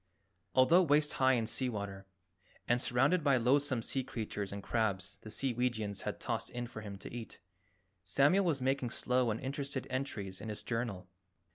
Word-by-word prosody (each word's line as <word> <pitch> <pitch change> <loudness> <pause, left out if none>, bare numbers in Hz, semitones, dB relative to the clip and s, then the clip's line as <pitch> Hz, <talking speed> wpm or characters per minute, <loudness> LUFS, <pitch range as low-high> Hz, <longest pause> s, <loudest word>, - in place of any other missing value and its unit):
Although 130 +8 +6
waist 150 -3 +3
high 130 0 +6
in 115 -3 +1
sea 130 +3 -1
water, 100 -3 -5 0.6
and 120 0 +2
surrounded 135 +9 +3
by 140 -3 +4
loathsome 130 0 +2
sea 135 +3 -1
creatures 110 -5 -4
and 100 0 -6
crabs 100 -5 -1
the 110 - -9
Seeweegians 115 -4 -1
had - - -4
tossed - - -2
in 120 0 -4
for 115 -2 -8
him 100 -2 -7
to - - -9
eat, 120 -2 -7 0.7
Samuel 165 +9 +4
was 150 -6 +1
making 135 -1 +1
slow 125 0 +1
and 110 +1 -1
interested 140 0 -3
entries 110 -8 -3
in 110 - -5
his 105 - -6
journal. 115 -6 -3
120 Hz, 170 wpm, -33 LUFS, 105-135 Hz, 0.7 s, Although